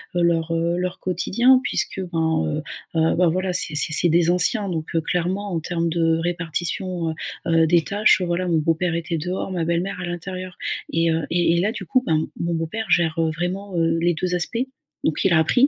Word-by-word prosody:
heu, 175 - +1
leur, 165 -1 +1
heu, 170 +1 0
leur 180 0 -3
quotidien, 235 +8 +3
puisque, 195 - -2
ben, 160 - +1
heu, - - -3 0.3
bah 160 0 +2
bah, 180 -1 +4
voilà, 185 +2 -1
c'est 175 -4 +4
c'est 155 - +5
c'est 175 - +6
des 170 +1 +3
anciens. 200 +4 +3
Donc 160 -3 -3
heu, 165 - +2
clairement, 185 +4 -2
en 165 - 0
termes 170 +1 -2
de 165 -1 +1
répartition, 175 +1 -2
heu - - -7 0.3
heu, 165 -1 +4
des 170 -1 +3
tâches, 205 -1 +3
heu, - - 0
voilà 175 +1 -1
mon 170 -2 +2
beau-père 165 +2 0
était 170 0 -2
dehors, 180 +4 -4
ma 170 -3 -2
belle-mère, 180 +3 -2
à - - -3
l'intérieur 185 +1 -6 0.3
et 165 0 +1
heu, 160 0 0
et 170 -1 +2
et - - +2
là, 210 +3 +1
du - - -7
coup, 255 -2 +2
ben, 160 - +2
m 155 - -1
mon 170 0 -1
beau-père 165 +8 -3
gère, 165 -2 +2
heu, 160 -1 +1
vraiment, 185 +4 -4
heu, 165 0 +2
les 175 +1 +2
2 180 +2 -1
aspects. 180 +6 -1 0.4
Donc 155 - 0
il 185 - +4
a 160 - +5
appris. 245 - +4
175 Hz, 225 wpm, -22 LUFS, 165-185 Hz, 0.4 s, c'est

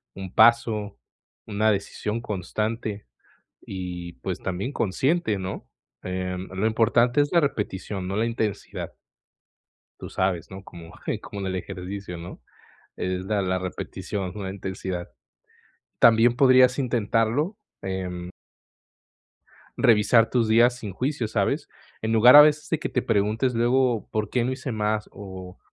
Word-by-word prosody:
un 95 -1 -8
paso, 110 -3 +3 0.5
una 110 +1 +1
decisión 105 +2 -3
constante 105 +1 -3 0.6
y, 90 -2 -6
pues 65 - -5
también 95 +7 -3
consciente, 130 - 0
¿no?, 95 0 -6 0.4
em, 90 0 -4
lo 95 +3 -3
importante 115 +3 +3
es 145 +2 +2
la 170 - +5
repetición, 100 -7 -3
no 95 - -3
la 110 +2 +1
intensidad. 115 -3 -3 1.1
Tú - - -8
sabes, 95 -3 -1
¿no?, 95 +1 -9
como 85 -3 -12 0.3
como 100 - -7
en 95 - -3
el 95 0 -2
ejercicio, 95 0 -6
¿no?, 85 +1 -9 0.6
es 90 0 -2
la 105 -1 0
la 95 0 0
repetición, 95 +1 -5
no 105 -2 -6
la 95 - -3
intensidad. 95 -2 -5 0.9
También 115 +1 +5
podrías 130 -1 +5
intentarlo, 125 - 0 0.3
em 90 -2 -4 1.5
revisar 115 +1 +4
tus 115 -3 +1
días 120 +2 +5
sin 105 -5 -6
juicio, 125 +3 -2
¿sabes?, - - -1 0.3
en 110 0 -1
lugar 120 +5 +8
a 150 - +12
veces 150 0 +2
de 160 - +1
que - - -3
te 125 - -1
preguntes 110 +4 +1
luego, 120 0 +2
¿por 105 -1 -2
qué 125 -2 +1
no 130 - -1
hice 130 0 -5
más?, 105 -1 -1
o, 95 -2 -9
105 Hz, 140 wpm, -25 LUFS, 95-120 Hz, 1.5 s, a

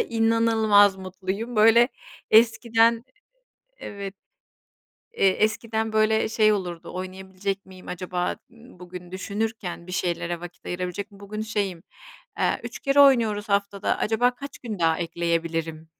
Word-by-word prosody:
inanılmaz 225 - +3
mutluyum. 190 +5 -5
Böyle, 225 +3 +6 0.4
eskiden 230 +1 +4 0.7
evet, 200 -1 -7 1.0
eee, 195 - +4
eskiden, 220 +2 0
böyle, 220 0 +2
şey 215 -1 +3
olurdu: 180 -5 -4
"Oynayabilecek 190 +1 -5
miyim 185 -1 -14
acaba, 180 0 -3 0.2
ııı, 235 -3 -17
bugün,” 180 0 -10
düşünürken, 200 -2 -4
"bir 180 - -8
şeylere 175 -2 -2
vakit 175 0 -11
ayırabilecek 180 +3 -4
miyim?” 200 0 -17
Bugün 210 +1 -6
şeyim, 200 -6 -3 0.6
eee, - - +1
"3 - - -6
kere 275 0 +3
oynuyoruz 225 -6 +4
haftada, 200 0 0
acaba 245 +3 +1
kaç 280 +3 -9
gün 220 -5 -6
daha 165 -1 +2
ekleyebilirim?” 165 -2 -2
200 Hz, 125 wpm, -25 LUFS, 180-225 Hz, 1.0 s, Böyle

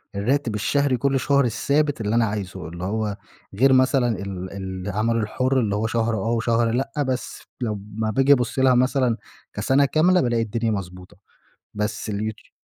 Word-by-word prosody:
الراتب 115 +2 0
الشهري 140 +5 +1
كُلّ 135 +2 +1
شهر 140 0 +2
الثابت 140 +4 0
اللي 105 +1 0
أنا 115 -1 +4
عايزه، 95 -4 -5
اللي 85 +2 -8
هو 105 +1 -2 0.4
غير 130 +5 +4
مثلًا 130 -1 +3
ال 95 -2 -6 0.3
العمل 110 +4 0
الحُر 130 +4 0
اللي 105 -4 0
هو 110 +2 0
شهر 115 0 0
آه، 110 +3 -1
وشهر 115 0 +1
لأ، 130 +3 -1 0.2
بس 130 -1 -3 0.2
لمّا 105 -1 -3
باجي 135 +5 +5
أبصّ 125 -1 -1
لها 130 -1 +5
مثلًا 125 -2 +2 0.4
كسَنَة 140 +2 +2
كاملة 175 +6 +3
بالاقي 120 -2 +1
الدنيا 115 +1 -1
مضبوطة، 90 -3 -6 0.6
بس 105 +1 -3
اليوتيو 105 +1 -4
115 Hz, 160 wpm, -23 LUFS, 105-130 Hz, 0.6 s, باجي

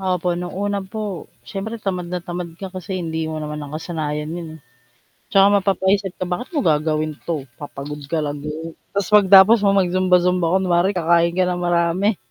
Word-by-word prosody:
Opo, 180 -2 0
no'ng 175 +1 -5
una 200 0 -1
po, 200 -1 -6 0.2
siyempre 215 +3 -5
tamad 185 -5 -3
na 180 -1 -4
tamad 175 -1 -5
ka 190 0 -8
kasi 185 0 -5
hindi 160 -2 -3
mo 155 - -4
naman 150 0 -5
nakasanayan 150 0 -4
'yon, 170 -1 -6
eh. - - -19 0.7
'Tsaka, 200 -3 +5
mapapaisip 195 0 0
ka, - - -3
"Bakit 180 +7 -4
mo 285 - +1
gagawin 155 0 +1
'to? 160 -5 -3 0.2
Papagod 145 0 -7
ka 155 0 -1
lang, 145 0 -4
do'n", 155 +3 -6 0.2
ta's 200 -1 -1
'pag 205 -2 +6
tapos 200 +4 +8
mo 200 -1 +3
mag-zumba-zumba 180 -1 +2
kunwari, 185 +1 +1
kakain 170 0 +2
ka 185 - +3
ng 180 -1 -1
marami. 175 +4 +1
180 Hz, 180 wpm, -21 LUFS, 160-190 Hz, 0.7 s, tapos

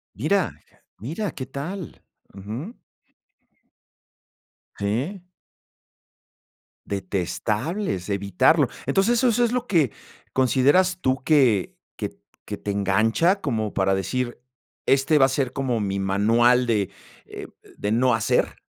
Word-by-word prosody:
Mira. - - +1 0.5
Mira, 165 - -3
qué 130 - -6
tal. 160 +7 -7 0.3
Ujú. 115 - -7 2.0
Sí. 130 - -2 1.6
Detestables 105 - -2
evitarlo. 100 - +3 0.2
Entonces, 200 +5 +2
¿eso 255 - +3
eso 240 +1 +3
es 235 - 0
lo 250 -1 -1
que 155 - +2 0.4
consideras 145 +8 +3
tú 130 -3 0
que 130 - +3 0.2
que - - -5 0.3
que - - -4
te 105 - -5
engancha 110 - +2
como 110 -7 -2
para 95 0 +2
decir, 120 +6 -2 0.5
este 140 +3 +3
va 135 - +6
a - - -3
ser 130 -2 -1
como 125 -4 -1
mi 100 -1 -2
manual 115 +6 +3
de 105 -4 0 0.4
eh, - - -9 0.3
de 105 - -2
no 125 +2 +3
hacer? 110 -1 0
125 Hz, 115 wpm, -24 LUFS, 105-160 Hz, 2.0 s, va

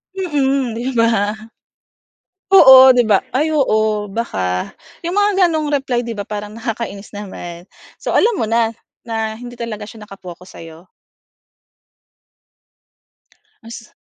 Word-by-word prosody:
Mm 275 -8 -1
'di 255 +3 -3
ba? 225 -3 +2 1.2
Oo 265 -7 +9
‘di 245 -1 +3
ba 200 -3 +3
ay 295 +5 +1
oo 215 -6 +1
baka. 95 - -3 0.3
Yung 345 +2 -3
mga 405 -2 +3
ganong 310 -3 -2
reply 270 -4 -1
‘di 235 -1 -5
ba 205 - -4
parang 210 0 -6
nakakainis 225 -3 -6
naman. 175 -4 -8 0.4
So - - -3
alam 460 +1 +3
mo 225 - -1
na, 230 0 +1 0.3
na 220 -1 -3
hindi 245 0 -10
talaga 220 -3 -6
siya 220 -1 -12
naka-focus 185 -3 -12
sa‘yo. 165 +2 -13 2.7
Mas 230 -1 -11
230 Hz, 125 wpm, -17 LUFS, 205-265 Hz, 2.7 s, Oo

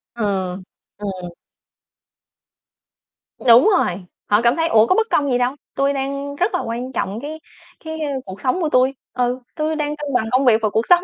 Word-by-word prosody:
Ừ, 235 - -3 0.7
ừ. 205 0 -5 2.3
Đúng 245 - +6
rồi, 180 +1 -1 0.2
họ 205 +1 +4
cảm 235 +1 +3
thấy, 325 0 +1
ủa, 220 -7 +5
có 370 - +3
bất 450 +2 +2
công 285 -2 +1
gì 245 - +3
đâu, 250 +2 0 0.2
tui 275 +1 +1
đang 280 +1 -3
rất 360 +7 0
là - - +1
quan 240 +3 -4
trọng 215 -4 -3
cái 310 +2 -6 0.5
cái 320 0 -5 0.3
cuộc 190 0 -9
sống 265 +8 0
của 320 - +1
tui. 255 0 +3 0.2
Ừ, 250 0 0 0.2
tui 310 0 -1
đang 300 -1 -2
cân 295 -2 -5
bằng 245 -3 +2
công 260 +2 +3
việc 230 -3 +5
và 215 - +1
cuộc 220 +3 0
sống, 355 0 +6
260 Hz, 190 wpm, -20 LUFS, 235-300 Hz, 2.3 s, Đúng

